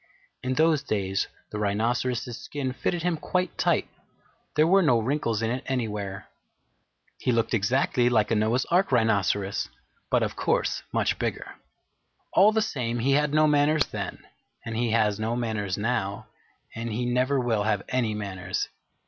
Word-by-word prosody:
In 130 0 -1
those 155 -1 +3
days 100 -7 -1 0.2
the 105 - -4
Rhinoceros's 120 +4 0
skin 135 0 -4
fitted 170 +5 -2
him 175 -2 +1
quite 180 +4 -1
tight. - - +1 0.7
There 155 - +5
were 195 +4 +5
no 135 -9 +4
wrinkles 115 -2 -1
in 110 - 0
it 125 +1 -3
anywhere. 105 -6 -3 0.9
He 125 - +1
looked 115 0 +1
exactly 120 +3 +2
like 110 -3 +2
a - - +3
Noah's 110 +4 +1
Ark 185 0 +3
Rhinoceros, 100 -4 +1 0.4
but - - +3
of - - -2
course - - 0
much - - 0
bigger. - - -3 0.8
All 200 +3 +6
the 220 0 +2
same, 120 - -2
he 125 +4 +1
had 145 +1 +3
no 155 +1 +4
manners 150 0 +3
then, - - -5 0.4
and 115 -1 -4
he 120 +1 0
has 110 -2 +2
no 110 +2 -1
manners 110 -5 -2
now, 105 -3 -1 0.5
and 115 0 -4
he 120 +3 -2
never 125 +3 +1
will 115 -4 +1
have 105 -2 +1
any 120 -4 0
manners. 95 -3 -3
120 Hz, 160 wpm, -26 LUFS, 105-140 Hz, 0.9 s, All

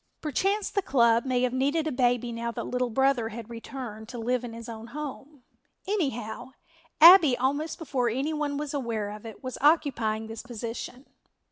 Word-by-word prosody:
Perchance 390 +8 0
the 400 - +1
club 235 -7 +3
may 250 -1 +1
have 250 -1 +1
needed 285 +5 +1
a 310 - -1
baby 245 -1 +1
now 235 0 -3
that - - -4
"Little 250 0 -1
Brother" 260 -1 +2
had 230 +1 -8
returned, 230 -2 -7
to 245 - -7
live 245 +2 -1
in 240 - -6
his 230 0 -9
own 225 -1 -8
home, 285 0 -8 0.4
anyhow, 260 - -3 0.5
Abbie, 325 -5 +9
almost 285 +5 -1
before 265 -6 -1
any 270 +7 -1
one 295 -2 -2
was 295 0 -4
aware 230 -7 -2
of 210 +2 -9
it, 220 - -11
was 255 -1 -5
occupying 250 -8 +2
this 225 0 -7
position. 240 +2 -7
250 Hz, 175 wpm, -27 LUFS, 230-285 Hz, 0.5 s, Abbie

